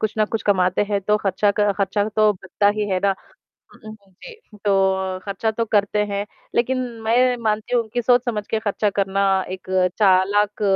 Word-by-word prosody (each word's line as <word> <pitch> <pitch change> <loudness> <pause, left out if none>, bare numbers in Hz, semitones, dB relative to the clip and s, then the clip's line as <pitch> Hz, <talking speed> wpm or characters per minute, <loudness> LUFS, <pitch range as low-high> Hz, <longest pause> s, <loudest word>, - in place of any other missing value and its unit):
कुछ 215 -1 -1
ना 215 - +4
कुछ 220 0 -4
कमाते 185 -1 +2
हैं 200 -1 0
तो 210 +2 +1
ख़र्चा 205 0 +1
क 205 -1 +3
ख़र्चा 200 +1 0
तो 215 0 +3
बनता 190 +2 -1
ही 210 -1 -1
है 185 - +1
ना। 195 -1 +3 0.6
हुँ, - - -18
हुँ, 200 -3 -19
जी, 460 - -12 0.3
तो 190 -2 +1
खर्चा 200 +2 -2
तो 230 +1 -2
करते 205 0 +2
हैं, 200 0 -3 0.3
लेकिन 255 +2 +1 0.3
मैं 245 +3 +3
मानती 215 +2 -1
हूँ 230 -2 0
कि 240 - 0
सोच-समझ 240 -3 +1
के 220 - +1
खर्चा 210 0 -1
करना, 195 -1 +1
एक 185 0 -8 0.3
चालाक 205 +1 +2
205 Hz, 185 wpm, -21 LUFS, 195-220 Hz, 0.6 s, ना